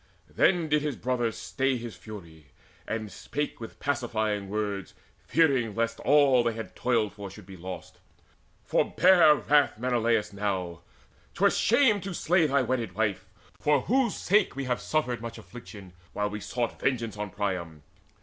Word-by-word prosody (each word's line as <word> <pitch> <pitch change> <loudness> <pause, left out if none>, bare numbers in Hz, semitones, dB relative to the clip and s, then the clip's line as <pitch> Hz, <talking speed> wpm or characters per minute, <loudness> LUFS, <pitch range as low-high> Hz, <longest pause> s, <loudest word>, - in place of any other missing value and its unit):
Then 175 -3 +3
did 150 0 +2
his 150 -3 -2
brother 120 -1 -1
stay 135 +3 -1
His 120 -2 -7
fury, 85 -9 -11 0.4
and 110 -2 -4
spake 145 0 -4
with 115 - -9
pacifying 110 -7 -1
words, 100 -2 -3 0.3
Fearing 135 -9 +2
lest 115 0 -1
all 140 -3 +5
they 115 -1 0
had 115 0 -8
toiled 115 -4 0
for 100 -1 -8
should 95 +1 -13
be 95 0 -11
lost: 90 +1 -9 0.6
"Forbear 175 -5 +5
wrath, 145 -5 +2
Menelaus, 115 -3 0
now: 95 -4 -3 0.5
'twere - - +4
shame 230 -4 +3
To 190 -1 -5
slay 170 -1 +3
thy 140 -1 +2
wedded 120 -6 -2
wife, 105 -2 -1 0.3
for 145 -2 +2
whose 245 - +1
sake 205 -3 +2
we 140 - -3
Have 125 -1 -1
suffered 125 -7 -1
much 115 0 -6
affliction, 105 -4 -11 0.2
while 105 0 -1
we 105 - -4
sought 120 +4 -3
Vengeance 115 -5 -1
on 105 -1 -4
Priam. 90 -7 -4
115 Hz, 155 wpm, -27 LUFS, 105-140 Hz, 0.6 s, all